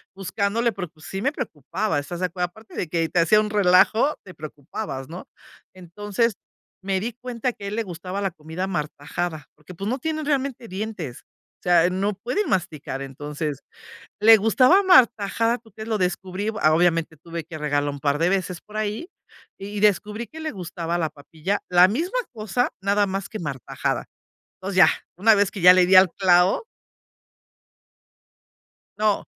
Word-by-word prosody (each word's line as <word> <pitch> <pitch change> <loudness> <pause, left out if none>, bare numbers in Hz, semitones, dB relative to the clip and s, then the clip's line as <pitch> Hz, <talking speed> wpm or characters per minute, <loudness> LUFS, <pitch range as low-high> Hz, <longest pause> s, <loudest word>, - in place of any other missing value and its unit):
buscándole, 200 +5 0
porque 180 -5 -6
sí 195 +4 -6
me 275 - +1
preocupaba. 175 - -3
¿Estas 170 +4 -6
de 185 - +2
acuerdo? 180 +1 -2
Aparte 220 +4 -16
de 175 - -2
que 165 -1 0
te 175 - +1
hacía 170 +6 +5
un 210 0 0
relajo, 210 +7 +4
te 185 - -12
preocupabas, 145 -1 -7
¿no? 175 +3 -9 0.5
Entonces 205 +5 -2 0.5
me 190 -1 0
di 230 +3 -4
cuenta 245 0 -3
que 200 - -10
a - - -3
él 205 - -4
le 230 - -1
gustaba 185 +2 -6
la 195 -2 -1
comida 160 +4 -5
martajada, 155 -2 -4
porque, 155 +4 -14
pues, 195 +4 -5
no 255 +4 -1
tienen 310 +1 -3
realmente 275 -4 -1
dientes. 190 - -5 0.4
O - - -37
sea, 175 -1 +4
no 200 +3 0
pueden 250 - -2
masticar. 155 -7 -2
Entonces, 145 +1 -5 0.6
le 225 +1 +9
gustaba 255 - +5
martajada, 235 - +4
¿tú 225 -4 -22
crees? 220 +1 -8
Lo 220 - +1
descubrí, 185 +1 -2 0.2
obviamente 165 -1 +2
tuve 165 +1 -7
que 160 0 -9
regarla 145 -1 0
un 140 0 -6
par 145 0 +1
de 170 +3 +2
veces 185 -2 -1
por 215 +1 -10
ahí, 215 - -3 0.5
y 205 +1 -6
descubrí 210 +2 +1
que 320 +7 -11
le 315 -1 -3
gustaba 170 -2 -4
la 160 -3 -1
papilla, 160 +7 -4
la 180 +1 +6
misma 345 - -1
cosa 230 +2 -1
nada 200 +1 +2
más 195 0 -3
que 215 - -7
martajada. 145 -6 -3 0.5
Entonces 190 +1 -5
ya, 190 - +8 0.3
una 220 +5 +5
vez 200 -1 +3
que 195 - -8
ya 180 +1 +9
le 185 -1 +5
di 190 - +5
al 185 -2 +8
clavo. 185 - +3 2.3
No, 210 -1 +1
190 Hz, 170 wpm, -23 LUFS, 170-215 Hz, 2.3 s, le